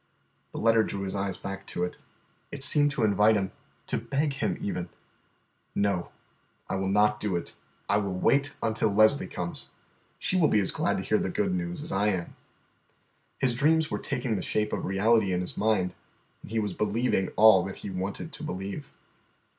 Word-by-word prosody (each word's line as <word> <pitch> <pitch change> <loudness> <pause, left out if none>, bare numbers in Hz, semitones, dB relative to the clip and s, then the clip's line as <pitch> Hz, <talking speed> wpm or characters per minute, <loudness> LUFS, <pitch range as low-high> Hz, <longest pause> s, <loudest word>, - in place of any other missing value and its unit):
The - - -8
letter 115 0 +4
drew 100 -2 -3
his 95 - -4
eyes 100 -1 -2
back 95 0 -7
to 90 - -3
it. 90 - -3 0.6
It 140 -2 -5
seemed 145 0 +4
to 140 - -1
invite 105 +1 +4
him, 95 -2 -1 0.3
to - - -2
beg 140 +5 -1
him 135 - -1
even. 90 -3 -3 0.9
"No, 100 -4 0 0.6
I - - -3
will 95 0 -1
not 105 +1 +3
do 105 -4 -1
it; 85 - -4 0.3
I 100 - +3
will 100 -3 -1
wait 140 +8 +2
until 110 0 +1
Leslie 110 +7 +4
comes. 85 -1 -5 0.5
She - - -1
will 175 -4 +5
be 105 - +3
as 95 - +4
glad - - 0
to 95 - -3
hear 110 +2 +2
the - - -1
good 195 +1 0
news 175 -3 -3
as 160 - -3
I 100 +2 +1
am." 95 -5 -2 1.0
His 130 -3 +1
dreams 155 +5 +2
were - - -1
taking 125 -4 -2
the - - -3
shape 105 0 -1
of - - -2
reality 100 +1 +2
in 90 - 0
his 90 - -5
mind, 105 -4 +1 0.5
and - - -12
he 115 - -2
was 105 -3 -1
believing 105 -1 0
all 110 -3 +7
that 95 - -6
he 100 - -4
wanted 95 +2 -4
to - - -6
believe. 95 +9 -5
105 Hz, 195 wpm, -28 LUFS, 95-125 Hz, 1.0 s, all